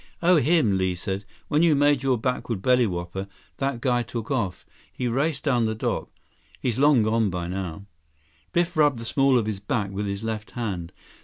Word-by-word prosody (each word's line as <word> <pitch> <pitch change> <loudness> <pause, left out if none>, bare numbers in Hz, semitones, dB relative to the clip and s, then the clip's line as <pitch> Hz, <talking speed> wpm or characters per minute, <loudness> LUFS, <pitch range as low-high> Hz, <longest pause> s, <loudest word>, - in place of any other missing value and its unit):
"Oh, 180 0 +6
him," 145 - +3
Li 95 -1 0
said. 95 +2 -4 0.2
"When 150 - +2
you 165 -3 +5
made 145 -1 +3
your 135 -2 +2
backward 115 -4 -2
bellywhopper, 95 -7 +1 0.3
that 135 -3 -2
guy 120 -2 +2
took 115 +2 -5
off. 105 -9 -2 0.3
He 125 - -3
raced 140 +4 0
down 125 -6 +2
the 110 - -2
dock. 110 - -2 0.5
He's 125 -1 -1
long 140 -5 +5
gone 110 0 +2
by 90 -1 -3
now." 95 +1 -5 0.7
Biff 175 0 +1
rubbed 145 -4 +4
the 115 - -6
small 135 +2 +3
of 115 - +1
his 105 -2 -3
back 105 -2 -2
with 100 +1 -3
his 100 +2 -4
left 110 -1 -4
hand. 95 -8 -3
115 Hz, 185 wpm, -25 LUFS, 100-135 Hz, 0.7 s, Oh